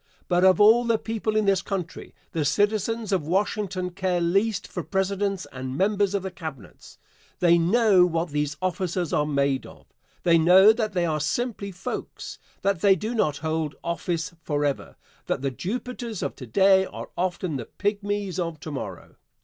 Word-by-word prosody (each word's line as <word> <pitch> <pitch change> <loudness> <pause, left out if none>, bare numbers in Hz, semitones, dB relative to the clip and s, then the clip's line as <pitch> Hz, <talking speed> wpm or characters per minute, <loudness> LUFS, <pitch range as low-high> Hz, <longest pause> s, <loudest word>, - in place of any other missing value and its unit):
But 175 0 +2
of 185 -2 +5
all 220 +3 +7
the 230 -1 +2
people 220 -1 -3
in 215 -1 +2
this 195 -2 +3
country 195 -4 -5 0.2
the 160 - -1
citizens 210 +6 0
of 175 -6 0
Washington 190 0 -1
care 185 -1 -1
least 195 +4 +1
for - - -5
Presidents 195 0 -1
and 130 0 -5
members 200 +1 +1
of 195 - -1
the 190 - -4
Cabinets. 150 - -10 0.4
They 170 -1 +4
know 190 0 +4
what 165 0 -1
these 150 -1 -2
officers 180 -1 -1
are 150 0 +2
made 140 -2 0
of. - - -15 0.4
They 170 -1 +5
know 190 +6 +7
that 215 -2 -2
they 175 -2 +1
are 155 -2 0
simply 200 - -2
folks 185 +1 -6 0.2
that 195 -4 +1
they 195 -2 +6
do 215 +6 -4
not 155 -11 +1
hold 160 -1 -1
office 170 +1 -2
forever 145 -2 -2 0.3
that - - -2
the 135 - 0
Jupiters 230 - -5
of - - -3
to 130 - -9
day 190 - +5
are - - -9
often 180 -4 -2
the 120 - -6
pygmies 205 -2 -2
of 165 -3 -3
to 155 - -6
morrow. 100 -10 -7
185 Hz, 175 wpm, -25 LUFS, 160-205 Hz, 0.4 s, all